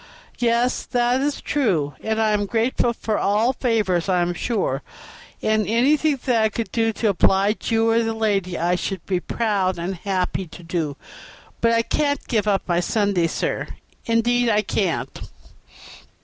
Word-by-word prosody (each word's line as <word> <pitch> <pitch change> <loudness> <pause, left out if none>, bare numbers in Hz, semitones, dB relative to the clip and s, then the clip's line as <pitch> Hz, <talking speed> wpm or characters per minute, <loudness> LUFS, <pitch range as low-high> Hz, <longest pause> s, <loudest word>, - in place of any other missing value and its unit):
"Yes, 240 +1 +2
sir, - - -7
that 245 +1 +2
is 290 +1 -1
true, 180 - 0
and 220 0 -1
I 220 -1 +2
am 205 -1 0
grateful 235 +2 +1
for 220 -2 -2
all 215 +5 +2
favors, 210 -8 0
I 180 -2 +3
am 175 0 -1
sure; 175 - -1 0.6
and 215 -2 +1
anything 275 +6 +2
that 240 -3 +2
I 220 - +3
could 225 +1 -4
do 225 -1 +1
to 220 0 0
oblige 195 +2 +2
you, 225 0 +3
or 230 +1 +3
the 225 -1 -2
lady, 195 -5 0
I 175 +2 +1
should 185 0 -3
be 185 -2 0
proud 195 -3 -1
and 175 +3 -3
happy 185 0 -2
to 175 +2 -12
do; 165 -4 -3 0.6
but 230 - +4
I 230 0 +3
can't 285 +2 -1
give 215 -4 0
up 200 -2 +2
my 175 -1 +2
Sundays, 185 -3 +1
sir, - - -2 0.4
indeed 235 +1 +2
I 210 -1 +2
can't. 190 -3 -2
215 Hz, 170 wpm, -22 LUFS, 185-230 Hz, 0.6 s, but